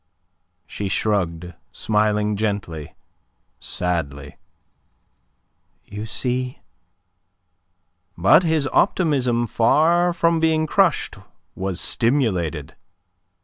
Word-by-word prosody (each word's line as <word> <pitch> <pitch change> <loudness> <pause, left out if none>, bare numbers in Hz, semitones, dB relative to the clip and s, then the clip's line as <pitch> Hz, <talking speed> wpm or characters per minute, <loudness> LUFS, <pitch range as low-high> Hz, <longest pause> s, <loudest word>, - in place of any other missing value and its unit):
She 100 - -5
shrugged, 90 -5 -1 0.2
smiling 105 -1 0
gently, 100 -8 -3 0.6
sadly. 75 -5 -3 1.5
"You 105 +2 -7
see..." 125 +3 -3 1.6
But 95 - +6
his 160 -5 0
optimism 130 - +2
far 165 +10 +3
from 170 -1 +1
being 160 -1 +2
crushed 180 0 +1 0.4
was 95 -1 -4
stimulated. 95 - 0
110 Hz, 70 wpm, -22 LUFS, 90-150 Hz, 1.6 s, But